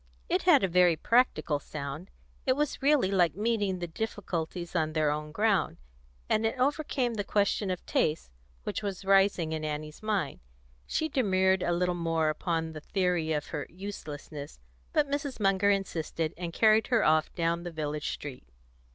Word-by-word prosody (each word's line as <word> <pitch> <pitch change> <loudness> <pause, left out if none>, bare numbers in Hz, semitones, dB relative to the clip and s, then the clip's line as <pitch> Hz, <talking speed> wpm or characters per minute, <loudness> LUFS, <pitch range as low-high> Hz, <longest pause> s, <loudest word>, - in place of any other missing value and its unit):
It - - +2
had - - +5
a - - +4
very 180 -1 +4
practical 220 - +2
sound; 145 +4 -6 0.4
it 255 - +5
was 295 +1 -2
really 275 -8 +3
like 175 -5 +3
meeting 205 -2 0
the 175 - -3
difficulties 175 -3 -4
on 155 -2 +1
their 155 -2 +2
own 150 0 -4
ground, 205 - +1 0.5
and 215 - +2
it 225 +3 0
overcame 265 -2 0
the 205 -2 -2
question 200 0 +1
of 180 -1 -3
taste 150 - 0 0.3
which - - -3
was 195 -2 -4
rising 195 -4 +3
in 155 -1 -3
Annie's 150 0 -5
mind. 210 -8 -1 0.5
She 315 - 0
demurred 190 -9 +2
a - - 0
little 180 +1 +1
more 165 -2 0
upon 160 +1 -1
the 155 - -7
theory 180 -3 0
of 150 -2 -2
her 150 -3 -4
uselessness; 150 - -8 0.3
but 295 - +2
Mrs. 280 -3 -3
Munger 195 0 +3
insisted, 165 -5 -1
and 175 0 -5
carried 220 +4 +4
her 235 -3 +3
off 155 0 +3
down 170 0 0
the 175 - -5
village 150 -2 -3
street. 135 - -8
180 Hz, 170 wpm, -29 LUFS, 155-205 Hz, 0.5 s, had